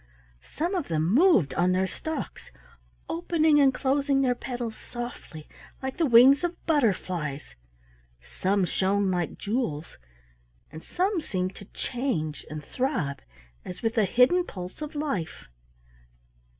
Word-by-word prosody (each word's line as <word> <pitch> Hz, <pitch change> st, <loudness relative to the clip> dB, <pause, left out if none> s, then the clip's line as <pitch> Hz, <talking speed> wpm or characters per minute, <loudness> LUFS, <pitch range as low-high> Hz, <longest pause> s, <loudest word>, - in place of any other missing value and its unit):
Some 340 Hz, +5 st, -2 dB
of 355 Hz, -6 st, -1 dB
them 160 Hz, +3 st, 0 dB
moved 270 Hz, -, +4 dB
on 180 Hz, +1 st, +2 dB
their 185 Hz, +1 st, +2 dB
stalks, 315 Hz, -, -6 dB, 0.6 s
opening 310 Hz, -, +2 dB
and 275 Hz, -2 st, +6 dB
closing 275 Hz, +1 st, +1 dB
their 250 Hz, -2 st, +3 dB
petals 240 Hz, -2 st, -5 dB
softly 240 Hz, -10 st, -8 dB, 0.4 s
like 265 Hz, +4 st, -4 dB
the 330 Hz, -3 st, +2 dB
wings 260 Hz, +5 st, +7 dB
of 350 Hz, 0 st, -1 dB
butterflies, 185 Hz, -, -1 dB, 0.7 s
some 190 Hz, -, 0 dB
shone 195 Hz, +2 st, +1 dB
like 175 Hz, -3 st, -2 dB
jewels, 200 Hz, -, -3 dB, 0.7 s
and 160 Hz, +1 st, -10 dB
some 370 Hz, 0 st, 0 dB
seemed 185 Hz, -8 st, -3 dB
to 200 Hz, -, -10 dB
change 190 Hz, -, -3 dB
and 150 Hz, -1 st, -7 dB
throb 250 Hz, -, -2 dB, 0.4 s
as 180 Hz, -, -7 dB
if -, -, -16 dB
with 225 Hz, +1 st, -1 dB
a 210 Hz, -, +4 dB
hidden 250 Hz, -, +4 dB
pulse 180 Hz, -, -8 dB
of 300 Hz, 0 st, -6 dB
life. 275 Hz, -, -3 dB
235 Hz, 135 wpm, -27 LUFS, 180-285 Hz, 0.7 s, wings